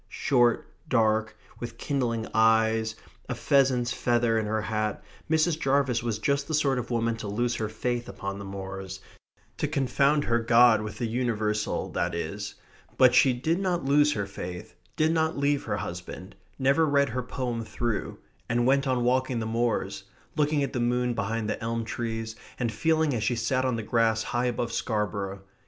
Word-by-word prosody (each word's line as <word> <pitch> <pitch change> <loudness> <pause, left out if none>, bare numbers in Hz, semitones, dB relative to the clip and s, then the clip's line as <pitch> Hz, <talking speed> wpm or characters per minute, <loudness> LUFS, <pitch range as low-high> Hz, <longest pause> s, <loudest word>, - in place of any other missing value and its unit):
Short, 120 -3 +2 0.2
dark, 110 -3 +2 0.2
with 120 -1 -6
kindling 120 -5 -1
eyes, 110 0 +3 0.3
a - - -1
pheasant's 130 -3 +2
feather 120 -2 +1
in 110 - -2
her 110 0 -1
hat, 110 -1 -2 0.3
Mrs. 160 0 +2
Jarvis 135 -4 +1
was 115 -3 -2
just 140 0 0
the 160 - 0
sort 140 -3 +2
of 120 - -5
woman 115 -1 0
to 110 - -6
lose 120 +4 0
her 110 -1 -2
faith 120 0 -3
upon 100 0 -5
the - - -6
moors 95 -1 -6 0.6
to 150 - 0
confound 140 0 +2
her 120 -3 +1
God 115 -1 +5
with 105 0 -6
the 120 - -2
universal 110 -3 -1
that 85 0 -1
is 100 +5 -4 0.4
but 130 -1 +6
she 130 +1 +6
did 155 +8 0
not 180 -6 -1
lose 145 +2 +4
her 100 -2 -2
faith, 90 -2 -7 0.2
did 155 +1 +2
not 160 -1 +1
leave 140 0 +1
her 100 - -1
husband, 90 0 -7 0.2
never 140 +4 +3
read 140 -1 +3
her 125 +3 -2
poem 125 -2 -3
through, 115 0 -3 0.3
and 120 +1 +2
went 135 +2 +3
on 125 -2 +1
walking 130 0 +1
the 110 - -3
moors, 110 -4 -1 0.3
looking 150 -1 +2
at 140 - -3
the 125 - -1
moon 125 +1 +1
behind 110 0 -2
the - - -3
elm 115 0 -2
trees, 115 -1 -4 0.2
and 120 -2 -1
feeling 160 +4 +1
as 115 -3 -1
she 120 +2 +1
sat 130 +3 0
on 130 -2 +1
the 115 - -3
grass 110 0 +2
high 120 +1 -1
above 120 -1 -2
Scarborough... 100 -3 -2
120 Hz, 180 wpm, -27 LUFS, 110-135 Hz, 0.6 s, but